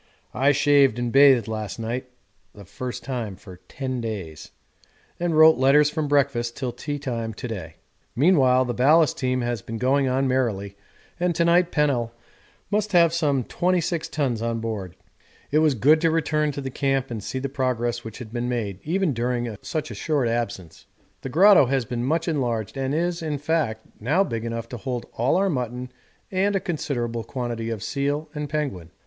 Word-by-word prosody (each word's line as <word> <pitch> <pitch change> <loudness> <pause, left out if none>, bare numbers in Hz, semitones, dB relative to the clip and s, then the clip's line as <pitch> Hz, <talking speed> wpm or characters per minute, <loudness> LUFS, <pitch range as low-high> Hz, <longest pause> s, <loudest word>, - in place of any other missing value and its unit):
I 135 +2 +3
shaved 140 -4 +4
and 120 -1 -2
bathed 135 -3 +6
last 110 -2 -4
night 120 +3 -4 0.5
(the 100 -1 -12
first 125 +7 -6
time 120 -7 -4
for 90 0 -13
10 130 -2 -4
days) 95 -9 -6 0.7
and 170 -2 0
wrote 160 -2 +7
letters 145 +3 +5
from 155 -1 -2
breakfast 135 -5 +1
till 130 -3 -2
tea 145 +5 -5
time 115 -6 -4
to 125 - -6
day. 90 -8 -6 0.4
Meanwhile 130 -4 +4
the 120 - -2
ballast 150 +4 +4
team 130 0 0
has 120 -3 -2
been 115 +3 -6
going 135 +3 +2
on 130 +1 +1
merrily, 110 -7 -1 0.4
and 175 -1 0
to 170 - +2
night 175 +1 +4
Pennell 125 -6 +1 0.6
must 210 0 0
have 170 -2 +5
some 145 -6 +1
26 170 +1 -1
tons 130 -8 -1
on 115 0 -1
board. 105 -6 -5 0.6
It 150 - +4
was 155 -3 +3
good 150 +8 +4
to 165 - +3
return 155 -2 +1
to 140 - -5
the 135 -1 -5
camp 135 -1 -1
and 110 -4 -5
see 130 - -4
the 135 +1 -2
progress 120 -3 -1
which 110 -2 -8
had 120 -3 -9
been 120 0 -2
made 105 -6 -3
even 175 0 0
during 120 -1 -2
such 155 -3 -4
a - - -5
short 145 -6 0
absence. 100 -8 -4 0.3
The 135 - -5
grotto 185 0 +6
has 130 -1 0
been 120 +1 -3
much 160 +6 0
enlarged 120 - -1
and 135 +1 -1
is, 175 +1 -1
in 155 -2 -2
fact, 145 -7 -1
now 150 - +2
big 115 - -4
enough 115 0 -4
to 120 - -6
hold 120 +3 -4
all 120 +3 +1
our 195 +2 +2
mutton 125 -5 -3 0.4
and 195 +2 +1
a - - +2
considerable 120 - -3
quantity 120 -3 -4
of 110 -4 -4
seal 145 +2 -2
and 150 -1 -4
penguin. 140 - -3
130 Hz, 185 wpm, -24 LUFS, 115-150 Hz, 0.7 s, wrote